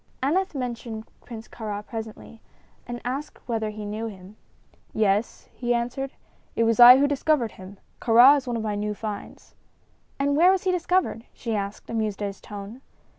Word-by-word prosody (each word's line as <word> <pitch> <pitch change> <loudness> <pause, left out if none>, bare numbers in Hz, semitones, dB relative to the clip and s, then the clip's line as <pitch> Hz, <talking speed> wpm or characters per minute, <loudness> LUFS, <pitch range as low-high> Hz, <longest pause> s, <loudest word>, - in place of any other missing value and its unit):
Aneth 360 +5 +1
mentioned 235 -3 -5 0.2
Prince 225 -2 -9
Kāra 210 -2 -6
presently, 225 0 -8 0.5
and 240 0 -5
asked 270 +4 -4
whether 225 -3 -1
he 210 0 -7
knew 215 +2 -4
him. 195 -1 -11 0.6
"Yes," 210 +1 0
he 240 -1 -1
answered; 245 +3 -3 0.4
"it 230 - +2
was 230 +1 +2
I 245 +1 +11
who 285 +1 +3
discovered 285 -4 +1
him. 190 +1 -12 0.2
Kāra 245 +4 +7
is 275 -2 -3
one 240 -1 -1
of 220 - -3
my 210 -1 -2
few 210 0 -2
finds." 210 -1 -7 0.6
"And 280 +1 +1
where 340 +5 +6
was 380 -1 +2
he 375 - +2
discovered?" 360 -9 0
she 230 -3 -4
asked, 200 0 -4
amused 215 -3 -2
at 200 - -1
his 195 - -11
tone. 205 +5 -9
230 Hz, 175 wpm, -25 LUFS, 210-265 Hz, 0.6 s, I